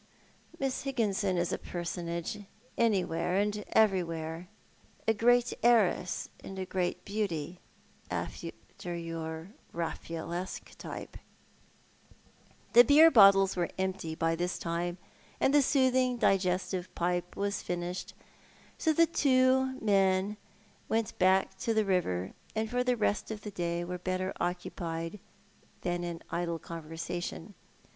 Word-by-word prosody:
" - - -25
Miss 270 -1 -1
Higginson 205 -8 0
is 175 0 0
a - - -2
personage 170 +2 -4 0.4
anywhere 180 -5 +1
and 205 +1 0
everywhere 170 -4 +1 0.3
— - - -31
a 225 - +5
great 245 +2 +3
heiress 220 -6 +3 0.2
and 190 - -8
a 190 - -3
great 180 -1 -2
beauty— 180 -5 -3 0.5
after - - -4 0.5
your 165 +2 -5 0.2
Raffaellesque 170 +2 -5
type." - - -7 1.6
The 240 - +10
beer 305 +6 +7
bottles 195 -4 +7
were 175 -2 0
empty 190 -4 -2
by 165 0 +1
this 175 +2 -2
time, 175 +1 -2 0.4
and 270 - +3
the 290 - +7
soothing 255 -2 +3
digestive 185 -3 0
pipe 175 0 -1
was 200 0 -1
finished, 175 +1 -4 0.6
so 320 - +2
the 335 +2 +5
two 260 -3 +3
men 195 -1 +2 0.5
went 225 -2 0
back 190 +1 +3
to 225 +3 0
the 215 -1 +3
river, 125 - 0 0.2
and 220 0 0
for 245 +2 0
the 250 -1 +1
rest 210 -1 0
of 215 -1 -5
the 210 - -6
day 175 -2 -2
were 180 +1 -5
better 185 +1 -2
occupied 170 0 -3 0.6
than 175 0 -1
in 170 -1 -5
idle 170 -1 -1
conversation. 165 +3 -6
185 Hz, 125 wpm, -31 LUFS, 175-220 Hz, 1.6 s, The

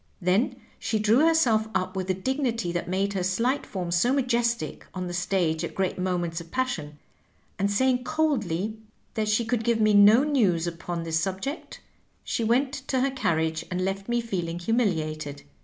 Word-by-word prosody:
Then 185 +6 +1 0.2
she 220 - -1
drew 215 +3 +3
herself 235 -10 +3
up 185 +1 -1
with 190 -1 -2
the 185 - +1
dignity 235 -2 -1
that 175 0 -3
made 195 +2 0
her 190 - -1
slight 230 +10 0
form 180 -3 -4
so 175 +9 +3
majestic 240 -3 0
on 185 -1 -3
the 175 - -5
stage 175 -3 0
at - - -5
great 190 -1 -1
moments 175 -2 -1
of 170 - -13
passion, 165 - -2 0.6
and 200 +1 +2
saying 250 +4 +2
coldly 220 - -1 0.3
that 215 -1 -1
she 215 +2 +2
could 230 0 0
give 235 -1 +1
me 215 -1 +4
no 205 +5 +7
news 210 - +2
upon 170 0 -4
this 160 -1 0
subject, 195 - -4 0.4
she 230 - -2
went 255 +4 +2
to 265 -2 -2
her 275 +1 +1
carriage, 160 -10 0
and 185 0 -1
left 195 +2 -3
me 240 0 +1
feeling 175 -7 -3
humiliated. 160 -8 -1
200 Hz, 175 wpm, -26 LUFS, 175-240 Hz, 0.6 s, no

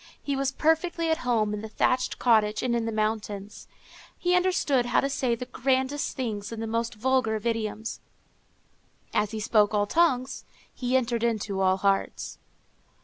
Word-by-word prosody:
He 280 - -2
was 270 0 0
perfectly 325 +2 +1
at 320 - +1
home 225 -4 +1
in 210 - -4
the 220 - -7
thatched 255 +3 +1
cottage 215 -3 +3
and 245 -2 +1
in 230 -1 0
the - - -1
mountains. 215 -2 -3 0.5
He 355 0 +2
understood 360 -9 +2
how - - +3
to 275 - 0
say 255 -3 0
the 250 - -6
grandest 265 +3 -1
things 215 -5 -3
in 230 - -5
the 225 - -3
most 230 +1 -2
vulgar 255 0 +1
of 215 +1 -5
idioms. 225 -1 -2 1.1
As 210 - +1
he 220 0 -5
spoke 215 -1 +3
all 205 0 +2
tongues, 260 -1 +1 0.3
he 250 0 +1
entered 235 -2 -1
into 215 -4 -1
all 190 0 +3
hearts. 195 0 -1
235 Hz, 170 wpm, -27 LUFS, 215-260 Hz, 1.1 s, cottage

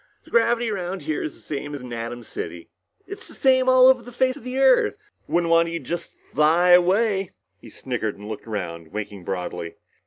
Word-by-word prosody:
"The - - -19
gravity 235 0 +2
around 185 -3 -4
here 155 0 -2
is 150 - -5
the - - -15
same 145 0 -5
as 140 - -7
in 125 -1 -8
Atom 115 +1 -5
City. 85 -5 -7 0.3
It's 400 +1 -9
the - - -14
same 260 -1 +3
all 255 0 +7
over 260 -1 +6
the 245 - -11
face 255 +2 +1
of 285 - -12
the 255 +1 -4
Earth. 265 -2 +4 0.3
Wouldn't 170 -1 +1
want 165 0 +4
you 170 - -3
to - - -10
just 170 -1 -5 0.2
fly 165 +4 +4
away." 190 +2 +3 0.3
He - - -13
snickered 115 -6 -4
and 105 +1 -10
looked 110 +1 -7
around, 85 -6 -5
winking 105 -2 -6
broadly. 90 -2 -4
170 Hz, 210 wpm, -23 LUFS, -, 0.3 s, all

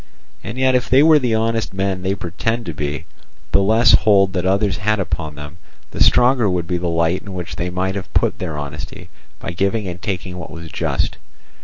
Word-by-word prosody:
And 110 +5 -6
yet 130 0 +3
if 125 -1 +1
they 135 +3 +6
were 155 -1 +6
the 120 -4 0
honest 115 -2 -1
men 95 -1 -1
they 95 +1 -1
pretend 100 +6 -3
to 85 - -4
be, 75 -1 -4 0.5
the 100 - +4
less 110 +4 +5
hold 100 -3 +4
that 90 -1 -1
others 100 +1 +1
had 105 +1 0
upon 80 -5 -3
them, 75 +3 -10 0.3
the - - -7
stronger 120 -3 +4
would 90 -2 -1
be 90 +1 -1
the 90 - -2
light 85 +2 +1
in 100 -3 -9
which 90 -2 -5
they 90 +1 -3
might 95 +1 -1
have 100 -1 -6
put - - +1
their 80 -5 -4
honesty 70 0 -7 0.3
by - - -5
giving 100 +4 -1
and 90 0 -6
taking 90 -3 -4
what - - -7
was 80 -1 -9
just. - - -1
95 Hz, 210 wpm, -19 LUFS, 85-110 Hz, 0.5 s, they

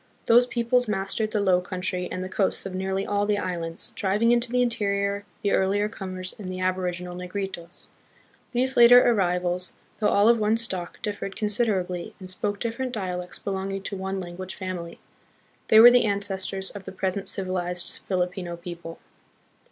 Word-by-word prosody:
These 240 +2 +5
peoples 245 +1 +1
mastered 210 +1 -1
the 215 - -1
low 180 -2 +3
country 180 0 -3
and 185 - -3
the - - -4
coasts 190 +1 0
of 195 - -5
nearly 190 +1 -2
all 205 0 0
the 210 -1 +2
islands, 170 -4 -1
driving 210 +4 +2
into 240 0 +2
the 250 0 +3
interior 200 -3 -1 0.2
the 200 - +1
earlier 200 +2 +2
comers 185 -4 -6
and 190 -3 -6
the 185 0 -5
aboriginal 180 -1 -2
Negritos. 180 -1 -6 0.7
These 260 +2 +1
later 245 +1 +8
arrivals, 180 -4 +1 0.3
though 210 - +2
all 205 +1 +4
of 235 0 +5
one 215 +1 +2
stock, 185 -7 0
differed 205 -2 -4
considerably, 205 -5 -1
and 185 - -9
spoke 205 +2 -3
different 245 +2 -3
dialects 180 -4 -4
belonging 195 0 -4
to 200 - -4
one 190 0 -3
language 185 +1 -7
family. 180 -3 -6 0.7
They 220 - +7
were 240 +2 +11
the 245 -1 +4
ancestors 195 -1 -1
of 200 -2 -10
the 190 - -7
present 190 0 -2
civilized 180 -2 -2
Filipino 180 -2 -2
people. 170 -1 -8
195 Hz, 165 wpm, -25 LUFS, 180-210 Hz, 0.7 s, were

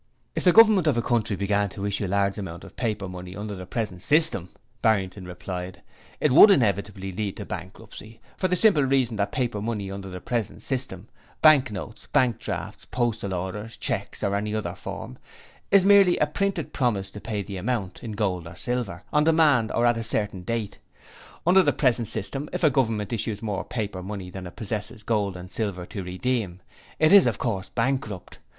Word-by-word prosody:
'If - - -2
the 180 - +7
Government 215 -5 +6
of 140 -6 +3
a - - +2
country 115 -4 0
began 100 +1 0
to 100 +2 -6
issue 100 0 -1
large 100 +2 0
amounts 85 -3 -7
of - - -14
paper 105 -5 -2
money 90 0 -8
under 105 0 -5
the 90 -2 -8
present 105 -7 -3
system,' 150 - +2 0.3
Barrington 95 -3 +1
replied, 90 0 -7 0.4
'it 150 - +2
would 160 +10 +9
inevitably 100 - +1
lead 100 +1 -4
to - - -6
bankruptcy, 110 +1 -9 0.2
for 185 - 0
the 180 - +1
simple 185 -5 +4
reason 130 -4 +1
that 100 0 0
paper 120 -5 -1
money 105 -3 -3
under 95 0 -6
the 90 0 -7
present 115 0 -3
system 125 -8 -3 0.4
bank 145 -6 +6
notes, 105 +2 -8
bank 130 -5 +2
drafts, - - -5
postal 115 -5 -2
orders, 105 +5 -5
cheques - - -2
or 100 0 +1
any 105 +1 -2
other 110 - -3
form 65 - -8 0.5
is 195 -2 +5
merely 195 -3 +6
a - - +3
printed 180 +2 -2
promise 110 -8 0
to 105 - -9
pay 105 -3 -3
the 95 0 -7
amount 100 -2 -3
in 110 -3 -5
gold 95 -5 -1
or 85 - -10
silver 105 -3 -3
on 150 0 +4
demand 150 -8 +4
or 120 - +1
at 120 -1 +3
a 115 - -3
certain 105 -4 -1
date. 110 +2 -3 0.7
Under 185 +3 +6
the - - +3
present 120 -4 +1
system 140 +6 -3
if 180 - -4
a 155 - +5
Government 115 -6 0
issues 110 -1 -2
more 105 -3 -2
paper 105 -6 -4
money 95 -1 -6
than 95 0 -7
it 85 - -12
possesses 110 0 -4
gold 100 -5 0
and 90 +1 -10
silver 100 -5 -2
to 100 - -6
redeem, 95 0 -2 0.4
it 155 +3 +4
is 200 -9 +8
of 115 - 0
course 100 -5 -2
bankrupt. 115 -6 -2
110 Hz, 195 wpm, -25 LUFS, 95-125 Hz, 0.7 s, would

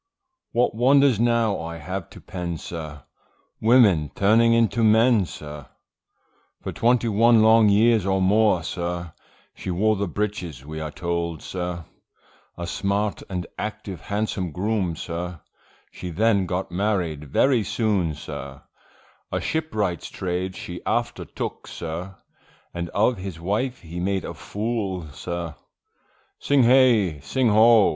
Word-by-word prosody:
What 120 +1 +2
wonders 130 0 +4
now 115 -4 +2
I 85 0 -6
have 90 +3 -5
to - - -13
pen, 85 -2 -5
sir, 75 -4 -7 0.6
Women 110 - +5
turning 115 +4 +4
into 115 0 +2
men, 110 -2 +4
sir, 75 -3 -9 1.0
For - - -3
twenty 120 0 +2
one 115 +1 +5
long 110 -1 +6
years, 110 +1 +4
or 95 0 +1
more, 100 -2 +3
sir, 85 -1 -4 0.4
She - - -7
wore 105 +5 +2
the 100 0 -1
breeches 90 -8 -4
we 80 +1 -6
are 80 0 -4
told, 85 -1 -3
sir, 90 -2 -4 0.7
A 85 - -4
smart 100 +4 -1
and 90 -2 -3
active 110 -4 -5
handsome 100 -4 -2
groom, 95 -1 -1
sir, 85 +1 -5 0.5
She 90 - -7
then 100 +2 +2
got 90 0 -3
married 90 -6 -1
very 120 - +2
soon, 100 -7 0
sir, 70 -2 -8 0.7
A - - 0
shipwright's 110 - -2
trade 95 0 -3
she 90 0 -7
after - - -1
took, - - -6
sir, 85 +3 -6 0.6
And 85 0 -4
of 110 +4 +1
his 95 -3 -6
wife, 110 +9 -2
he 85 +1 -7
made 95 +1 -1
a - - -5
fool 100 -6 -3
sir. 85 +1 -5 0.9
Sing 140 -2 +3
hey! 115 - +4
sing 115 - +1
O! 110 0 +6
95 Hz, 135 wpm, -24 LUFS, 85-110 Hz, 1.0 s, long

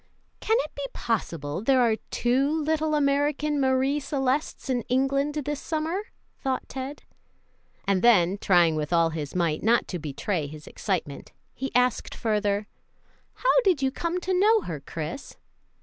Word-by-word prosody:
"Can 445 +1 +2
it 305 - -8
be 285 - -6
possible 165 -8 -2
there 260 +3 +3
are 230 -3 +3
two 255 +4 +1
little 310 0 0
American 290 +1 +1
Marie 265 +2 +2
Celestes 275 +1 -1
in 250 -2 0
England 275 +3 +1
this 295 -1 -3
summer?" 325 +5 -2 0.3
thought 265 -2 -2
Ted; 270 +2 -6 0.8
and 195 -2 +2
then, 195 -5 +4
trying 175 -5 +4
with 150 0 -3
all 165 -1 +3
his 155 -2 -5
might 170 -4 0
not 230 +3 +3
to 180 - -3
betray 150 +2 -2
his 150 +1 -10
excitement, 175 -8 -4 0.2
he 270 +1 -4
asked 250 -1 +1
further, 210 -2 0 0.7
"How - - +3
did 355 - +2
you 265 - +2
come 340 +5 -2
to 375 +1 -1
know 435 +2 +5
her, 160 - -5
Chris?" 160 - -6
255 Hz, 150 wpm, -26 LUFS, 180-290 Hz, 0.8 s, know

